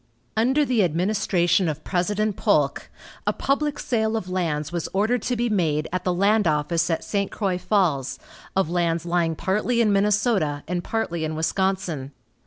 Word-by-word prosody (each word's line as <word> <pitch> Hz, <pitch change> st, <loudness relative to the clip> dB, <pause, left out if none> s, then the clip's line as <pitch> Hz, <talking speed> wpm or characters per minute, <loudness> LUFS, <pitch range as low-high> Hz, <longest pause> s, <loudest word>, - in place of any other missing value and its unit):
Under 260 Hz, +7 st, +3 dB
the 245 Hz, -6 st, +2 dB
administration 180 Hz, 0 st, +1 dB
of 155 Hz, 0 st, -5 dB
President 205 Hz, +3 st, 0 dB
Polk, -, -, +1 dB, 0.4 s
a -, -, +4 dB
public 285 Hz, +1 st, 0 dB
sale 220 Hz, -2 st, 0 dB
of 185 Hz, -, -5 dB
lands 155 Hz, -4 st, -1 dB
was 170 Hz, -2 st, -3 dB
ordered 220 Hz, +5 st, +1 dB
to 245 Hz, -, -1 dB
be 240 Hz, +1 st, 0 dB
made 160 Hz, -8 st, 0 dB
at 185 Hz, -1 st, -1 dB
the 180 Hz, -, +1 dB
land 200 Hz, +2 st, +3 dB
office 155 Hz, +2 st, +1 dB
at 165 Hz, -, -1 dB
St. 200 Hz, -1 st, -1 dB
Croix 190 Hz, -4 st, -1 dB
Falls, 180 Hz, -8 st, +1 dB, 0.4 s
of 195 Hz, -3 st, +2 dB
lands 170 Hz, 0 st, 0 dB
lying 170 Hz, -2 st, +1 dB
partly 210 Hz, +8 st, 0 dB
in 215 Hz, -3 st, +3 dB
Minnesota 200 Hz, -, +1 dB
and 175 Hz, 0 st, -2 dB
partly 175 Hz, -7 st, -2 dB
in 155 Hz, 0 st, -2 dB
Wisconsin. 170 Hz, -4 st, -1 dB
185 Hz, 165 wpm, -24 LUFS, 165-215 Hz, 0.4 s, a